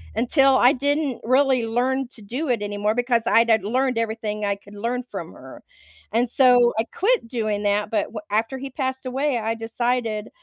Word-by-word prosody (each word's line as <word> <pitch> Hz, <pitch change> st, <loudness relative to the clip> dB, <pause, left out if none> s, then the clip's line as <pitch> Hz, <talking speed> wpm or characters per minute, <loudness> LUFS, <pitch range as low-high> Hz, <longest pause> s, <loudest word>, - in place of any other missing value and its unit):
until 265 Hz, +3 st, +3 dB
I 250 Hz, +3 st, +5 dB
didn't 285 Hz, 0 st, -1 dB
really 255 Hz, 0 st, +2 dB
learn 255 Hz, +3 st, 0 dB
to 240 Hz, -, -15 dB
do 255 Hz, +8 st, -4 dB
it 235 Hz, -4 st, 0 dB
anymore 205 Hz, +1 st, -1 dB
because 240 Hz, -1 st, +1 dB
I'd 230 Hz, 0 st, +4 dB
had 220 Hz, -3 st, +3 dB
learned 255 Hz, +4 st, 0 dB
everything 220 Hz, -2 st, -3 dB
I 200 Hz, -1 st, 0 dB
could 205 Hz, +1 st, -17 dB
learn 235 Hz, +4 st, -2 dB
from 250 Hz, -, -8 dB
her. -, -, -13 dB, 0.5 s
And 235 Hz, +2 st, +1 dB
so 245 Hz, -2 st, +4 dB
I 225 Hz, -, +1 dB
quit 430 Hz, -, 0 dB
doing 215 Hz, -4 st, -2 dB
that, 205 Hz, +1 st, 0 dB
but 210 Hz, -3 st, +1 dB
w 220 Hz, -, -7 dB
after 225 Hz, +5 st, 0 dB
he 270 Hz, +1 st, -6 dB
passed 260 Hz, -1 st, -3 dB
away, 265 Hz, +1 st, -1 dB
I 225 Hz, 0 st, -1 dB
decided 225 Hz, -1 st, -2 dB
240 Hz, 190 wpm, -23 LUFS, 220-260 Hz, 0.5 s, I